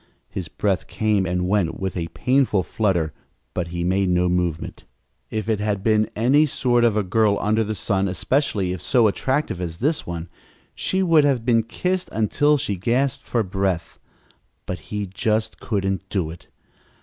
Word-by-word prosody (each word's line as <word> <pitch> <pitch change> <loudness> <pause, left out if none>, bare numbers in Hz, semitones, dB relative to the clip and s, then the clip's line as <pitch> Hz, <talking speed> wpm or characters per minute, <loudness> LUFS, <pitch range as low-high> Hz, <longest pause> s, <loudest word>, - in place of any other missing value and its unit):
His 90 -4 -5
breath 95 +1 -1
came 105 -3 +1
and 90 0 -1
went 95 -4 0
with 95 -1 -3
a 85 -2 -2
painful 125 +1 +1
flutter 85 -7 0 0.4
but 90 -2 -2
he 85 0 -3
made 95 +2 +1
no 90 0 +2
movement. 90 -3 -2 0.5
If 110 -2 -3
it 110 -2 +1
had 105 -2 -1
been 110 -1 +3
any 135 +8 +4
sort 120 -3 +2
of 115 -3 +3
a 105 - +2
girl 100 +2 +2
under 110 +2 +2
the 110 0 -3
sun, 100 -2 0
especially 95 - 0
if 90 - -6
so 120 -4 +3
attractive 130 - 0
as 85 -2 -4
this 150 - 0
one, 85 -1 -5 0.5
she 190 0 0
would 165 -4 +5
have 135 -5 +1
been 115 -2 +4
kissed 180 +11 -2
until 145 +8 +2
she 100 -7 -2
gasped 120 +7 0
for 115 -2 +1
breath; 95 -3 -2 0.7
but 90 - -4
he 105 -1 -2
just 110 +3 -1
couldn't 95 -2 -2
do 90 -6 -1
it. 85 - -12
105 Hz, 175 wpm, -23 LUFS, 90-120 Hz, 0.7 s, would